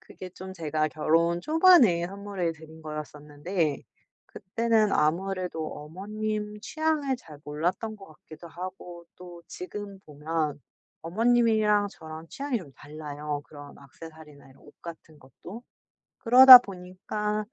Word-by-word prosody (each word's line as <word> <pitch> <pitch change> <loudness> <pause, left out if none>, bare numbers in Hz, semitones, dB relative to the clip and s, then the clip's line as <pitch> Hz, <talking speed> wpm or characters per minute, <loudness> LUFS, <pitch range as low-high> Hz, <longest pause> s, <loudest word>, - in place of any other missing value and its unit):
그게 185 -1 -11
좀 190 +1 -10
제가 155 -3 -2
결혼 165 +3 +1
초반에 305 - +4
선물해 195 -3 -4
드린 160 0 -15
거였었는데 150 +1 -4 0.4
그때는 220 +1 0
아무래도 175 +1 -1
어머님 210 +6 -5
취향을 305 0 -1
잘 155 -11 -15
몰랐던 175 +9 -3
것 195 -2 -14
같기도 155 +1 -14
하고 175 0 -9
또 175 -1 -12
지금 200 +2 -8
보면 150 -2 -4 0.4
어머님이랑 215 +1 +2
저랑 160 -2 -11
취향이 275 - -3
좀 160 -9 -13
달라요, 150 0 -7
그런 145 -1 -13
액세서리나 150 0 -14
이런 130 - -22
옷 145 - -18
같은 160 -2 -11
것도. 170 - -12 0.6
그러다 255 +2 +10
보니까 210 +1 -5
175 Hz, 280 characters per minute, -26 LUFS, 155-210 Hz, 0.6 s, 그러다